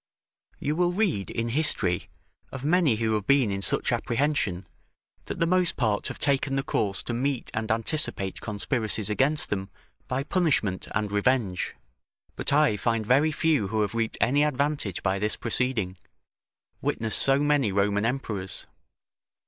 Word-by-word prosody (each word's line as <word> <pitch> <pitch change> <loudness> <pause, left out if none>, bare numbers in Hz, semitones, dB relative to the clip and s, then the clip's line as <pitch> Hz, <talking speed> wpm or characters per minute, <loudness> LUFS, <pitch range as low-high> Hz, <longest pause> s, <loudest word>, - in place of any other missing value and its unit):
You 150 +2 -2
will 175 +1 +2
read 180 - 0
in 115 0 -2
history, 115 - 0 0.4
of 135 0 -6
many 160 -6 +3
who 110 0 0
have 105 -2 -2
been 140 -6 +4
in 100 0 -3
such - - +1
apprehension, 120 -8 0 0.6
that - - -5
the 165 - +3
most 180 0 +2
part 110 -4 0
have - - -6
taken 140 -1 +1
the 135 - 0
course 100 -6 -1
to 120 - -4
meet 130 +1 -2
and 110 +1 -3
anticipate 110 -4 -1
conspiracies 110 -1 -1
against 140 +7 +1
them 95 -1 -2 0.4
by 130 +2 -1
punishment 140 - 0
and 105 -1 -1
revenge; 105 -3 0 0.6
but - - 0
I 145 -7 +4
find 115 +1 0
very 140 +7 +3
few 155 -10 +1
who 110 +2 -1
have 105 - -1
reaped 115 -1 -1
any 145 +4 +3
advantage 145 - -1
by 95 0 0
this 105 +1 -1
proceeding; 115 -6 -1 0.8
witness 110 -1 0
so 135 0 +5
many 145 -6 +2
Roman 100 +1 +1
emperors. 110 -6 -3
115 Hz, 155 wpm, -26 LUFS, 105-145 Hz, 0.8 s, so